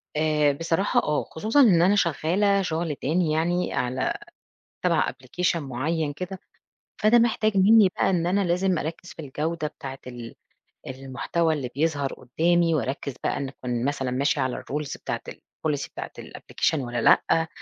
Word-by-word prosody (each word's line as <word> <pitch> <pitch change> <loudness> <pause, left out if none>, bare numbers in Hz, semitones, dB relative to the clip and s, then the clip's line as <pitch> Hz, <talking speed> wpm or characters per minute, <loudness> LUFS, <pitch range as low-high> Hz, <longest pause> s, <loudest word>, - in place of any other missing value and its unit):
آآ، 150 -1 +3
بصراحة 165 +6 +1
آه، 150 0 0
خصوصًا 220 - +2
إن 185 -10 +6
أنا 190 +4 +4
شغّالة 195 +3 +2
شُغل 165 -3 -2
تاني 160 +4 0
يعني 175 +3 0
على 125 +1 -1 0.6
تبع - - +2
Application 180 -1 -2
معيّن 145 +2 -2
كده، 185 +5 -6 0.6
فده 225 +3 +6
محتاج 220 -3 +2
منّي 210 +1 +6
بقى - - +2
إن 170 -3 +1
أنا 195 +3 +2
لازم 180 0 +1
أركّز 165 +3 -5
في - - -9
الجودة 155 +3 -3
بتاعة 135 -2 -8
ال 120 -2 -8 0.5
المحتوى 135 +5 -1
اللي 135 -5 -4
بيظهر 145 -2 0
قدّامي، 165 +6 +1
وأركّز 140 -1 -2
بقى - - 0
إن 140 -1 -3
أكون 125 -2 -4
مثلًا 135 -2 -1
ماشية 140 +3 +1
على 130 -1 -2
الRules 150 0 -4
بتاعة - - -3
الPolicy 150 -3 -4
بتاعة - - -7
الApplication - - -2
والّا 120 -3 -3
لأ 165 0 +4
160 Hz, 155 wpm, -25 LUFS, 135-180 Hz, 0.6 s, إن